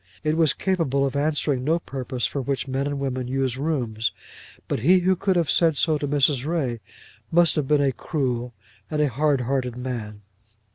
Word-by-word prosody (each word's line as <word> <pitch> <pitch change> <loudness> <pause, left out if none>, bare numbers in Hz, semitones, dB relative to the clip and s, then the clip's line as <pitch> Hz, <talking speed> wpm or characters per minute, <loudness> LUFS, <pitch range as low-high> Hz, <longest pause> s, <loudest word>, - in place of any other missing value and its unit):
It 155 0 +1
was 160 -4 +3
capable 160 -8 0
of 135 0 -3
answering 145 -2 0
no 160 +5 +2
purpose 130 -5 -4
for 140 - -2
which 135 +1 -2
men 135 +1 -1
and 145 0 -2
women 130 -2 -3
use 130 -1 -1
rooms; 125 -7 -1 0.6
but - - -1
he 180 +10 +4
who 185 +1 +3
could 190 +1 0
have 170 -4 +2
said 165 -4 +3
so 155 -3 +2
to 145 - -2
Mrs. 140 -2 +2
Ray 140 -7 -1 0.5
must 170 -1 +5
have 150 -3 -1
been 150 0 +3
a 135 - +2
cruel 125 -4 -3 0.3
and 155 - -2
a 150 -1 +3
hardhearted 130 -2 0
man. 115 -5 -5
140 Hz, 185 wpm, -24 LUFS, 125-155 Hz, 0.6 s, must